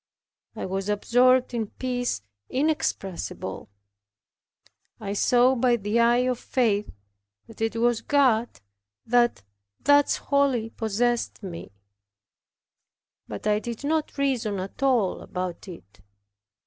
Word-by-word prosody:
I - - -4
was 195 +1 -3
absorbed 250 +5 +3
in 225 -3 -1
peace 245 - -3 0.3
inexpressible; 260 - -2 1.3
I 200 -2 -4
saw 245 +5 +4
by 250 -1 +3
the 210 +1 -1
eye 240 +2 +4
of 250 -2 -1
faith 215 -5 0 0.6
that 225 -1 -14
it 225 0 0
was 235 0 +2
God 245 - +2 0.4
that 240 - +2 0.4
thus 285 +1 +4
wholly 270 -5 +1
possessed 230 +1 -1
me; 175 -3 -7 1.6
but 105 -2 -7
I 210 0 +2
did 235 +3 -6
not 310 +1 -1
reason 240 -8 0
at 190 +6 -7
all 245 -8 +2
about 180 +1 -5
it. 100 - -12
235 Hz, 110 wpm, -25 LUFS, 205-255 Hz, 1.6 s, saw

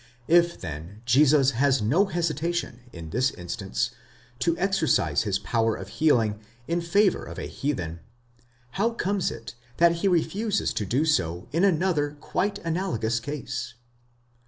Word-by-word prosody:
If, 170 +1 +4
then, 85 +6 -8
Jesus 135 +2 +5
has 135 +2 +2
no 140 - +3
hesitation, 170 - -2
in 80 -2 -9
this 130 +6 +2
instance, 95 +1 -3 0.5
to 170 +6 +1
exercise 195 -4 +2
his 100 -3 0
power 115 +2 0
of 95 - -8
healing 115 -7 +2 0.3
in 170 +1 0
favour 190 +4 +2
of - - -9
a - - -4
heathen, 90 - -3 0.7
how 225 - 0
comes 200 -3 0
it 115 - -8 0.2
that 170 0 +4
he 195 - 0
refuses 195 +4 0
to 105 - -2
do 135 +10 +1
so 90 - 0
in 165 +5 +1
another 160 -5 +1
quite 200 +6 -1
analogous 160 - -1
case? 125 -2 -5
145 Hz, 140 wpm, -26 LUFS, 115-175 Hz, 0.7 s, Jesus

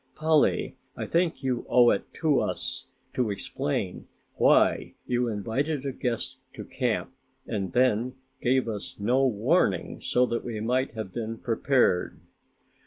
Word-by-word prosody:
Polly, 155 -1 +2 0.2
I - - -3
think 170 -3 0
you 125 -2 -1
owe 120 -1 +6
it - - -2
to 150 -4 +2
us - - -3 0.3
to 125 -4 0
explain 100 -1 -3 0.3
why - - +3
you 125 -1 0
invited 130 +8 -2
a 135 - -1
guest 125 -2 -3 0.2
to - - -8
camp - - -1 0.3
and 95 -4 -3
then 125 0 +2 0.3
gave 130 0 +2
us 105 -3 -5
no 125 +6 +2
warning 115 - +1
so 125 - +2
that 115 -1 -2
we 115 -3 -4
might 125 +2 0
have 110 -4 -5
been 115 -1 -4
prepared." 115 -5 +1
120 Hz, 140 wpm, -27 LUFS, 110-135 Hz, 0.3 s, owe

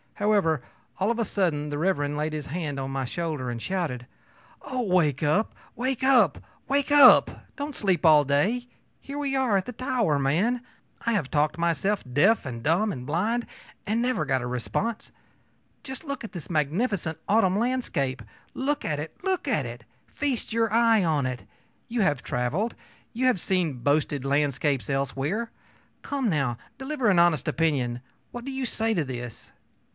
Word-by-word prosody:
However, 200 -7 +2 0.4
all 195 +3 +1
of 235 - -2
a 230 - 0
sudden 155 -9 0
Mr. 145 -2 0
laid 155 +1 -2
his 150 -2 -4
hand 150 -3 -3
on 135 0 -3
my 135 -1 -2
shoulder 155 -3 -3
and 120 - -4
shouted: 160 -10 -2 0.6
ōOh, 255 -4 -3
wake 160 -7 +2
up! 155 +9 +2 0.2
wake 260 +1 -2
up! 265 -2 +4 0.3
wake 280 +1 +1
up! 285 -3 +8 0.3
Don't 285 -1 -5
sleep 190 -4 +1
all 155 -2 +7
day! 195 - +1 0.3
Here 280 +1 -8
we 280 -2 -1
are 255 -7 +2
at 190 - -1
the - - -5
Tower, 235 - 0
man! 185 - +1 0.4
I 230 - +2
have 165 -11 0
talked 150 +1 +1
myself 170 +4 0
deaf 195 - +4
and 120 -3 -5
dumb 185 +8 +2
and 125 -6 -6
blind, 210 - 0 0.4
and 220 +3 0
never 245 -10 0
got 130 -3 0
a - - -3
response. 190 - -3 0.7
Just 265 +1 -6
look 280 -4 -5
at 225 - -7
this 175 -7 -8
magnificent 160 - 0
autumn 200 -3 +3
landscape! 210 - -1 0.3
Look 285 +2 -1
at 150 -2 -1
it! 155 +2 -6
look 375 -5 -1
at 210 - +1
it! 120 0 -9 0.2
Feast 275 -5 -2
your 225 -1 +1
eye 225 -2 +4
on 155 -5 +1
it! 125 -1 -5 0.4
You 235 -1 -1
have 145 -10 +1
traveled; 150 - -1 0.4
you 250 +3 -1
have 255 -7 +3
seen 170 -8 0
boasted 145 +1 +1
landscapes 140 -1 0
elsewhere. 140 - -1 0.5
Come, 275 -5 -1
now, 135 - 0 0.2
deliver 265 -2 -1
an 190 - +4
honest 170 -6 +3
opinion. 130 -7 0 0.3
What 240 0 -7
do 275 - -4
you 265 -1 -3
say 225 0 0
to 165 - +1
this? 120 -3 -7
175 Hz, 170 wpm, -26 LUFS, 145-235 Hz, 0.7 s, up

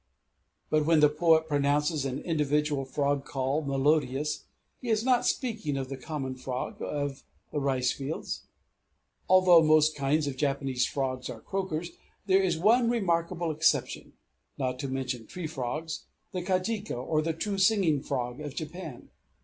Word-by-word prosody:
But 155 0 +3
when 165 -1 +5
the 150 -1 +6
poet 160 +1 +3
pronounces 145 +1 +1
an 135 +1 -3
individual 150 -3 0
frog 140 +1 0
call 135 +2 -1
melodious, 145 0 0 0.3
he 250 - -6
is 220 -1 +2
not 250 -2 +3
speaking 210 - -1
of 135 -1 -4
the 135 - -4
common 135 0 -4
frog 130 0 -5
of 145 -2 -3 0.3
the 150 - -1
ricefields. 135 +2 -2 0.8
Although 185 -2 +7
most 155 0 +4
kinds 145 +2 +1
of 140 -2 -4
Japanese 135 -3 0
frogs 130 -2 -3
are - - -6
croakers, 175 -4 -3 0.3
there 195 -1 +4
is 175 -4 +1
one 230 +7 +4
remarkable 170 -6 0
exception 155 +1 0 0.4
(not 125 -1 -2
to 140 - -3
mention 130 -3 -3
tree 180 -2 -6
frogs), 155 +2 -4 0.3
the 180 - -3
kajika, 195 - -1
or 155 +5 0
true 165 +6 -2
singing 190 -8 +3
frog 125 -2 -3
of 145 -2 -6
Japan. 155 -4 -7
150 Hz, 145 wpm, -29 LUFS, 135-170 Hz, 0.8 s, Although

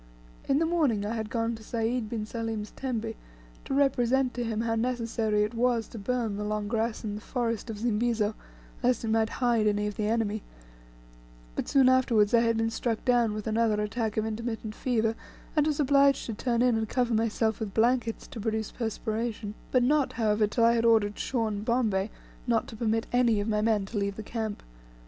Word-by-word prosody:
In 275 - +4
the 325 - +2
morning 295 -12 +1
I 215 - -2
had 220 -1 -3
gone 230 0 -1
to 220 - -8
Sayd 230 0 -1
bin 220 -2 -3
Salim's 225 -2 -4
tembe, 230 -4 -3 0.5
to - - -3
represent 265 -2 +2
to 245 - -2
him 225 -1 -2
how 230 0 0
necessary 225 -2 0
it 210 +2 -2
was 235 -1 +1
to 225 - -8
burn 225 -1 -1
the 210 - -3
long 210 0 -2
grass 225 +1 -1
in 210 -2 -3
the 210 - -6
forest 230 -1 -2
of 220 - -4
Zimbizo, 225 -1 0 0.5
lest 245 -1 +1
it - - -2
might 220 0 +2
hide 235 -4 +1
any 210 0 +1
of 210 -1 -4
the 210 -2 0
enemy; 220 -1 0 1.1
but - - -2
soon 270 -2 +5
afterwards 245 -5 +4
I 235 - +7
had 230 -1 +2
been 225 0 0
struck 230 -1 -2
down 240 -4 +3
with 215 - -5
another 220 -1 +1
attack 210 +1 -2
of 215 - +1
intermittent 220 0 -4
fever, 225 -2 0 0.4
and 300 -1 +3
was 300 -1 0
obliged 280 -1 +4
to 230 - -4
turn 235 +2 0
in 240 -3 +3
and 220 -1 -3
cover 245 -2 +1
myself 225 0 +1
with 210 -3 -5
blankets 230 0 +1
to 230 - -8
produce 220 0 -2
perspiration; 220 -1 -3 0.2
but 255 -1 +4
not, 290 +2 +2
however, 215 -2 +2
till 230 +3 0
I 230 0 +6
had 230 -1 +1
ordered 220 -3 +3
Shaw 240 -4 0
and 210 -1 -3
Bombay 220 -4 +1 0.4
not 230 -2 +1
to 225 - -9
permit 225 0 0
any 240 -3 +3
of 205 - -2
my 210 -1 +1
men 215 -2 +2
to 205 +1 -3
leave 200 0 -1
the 220 - -6
camp. 220 -1 -4
225 Hz, 205 wpm, -28 LUFS, 215-240 Hz, 1.1 s, I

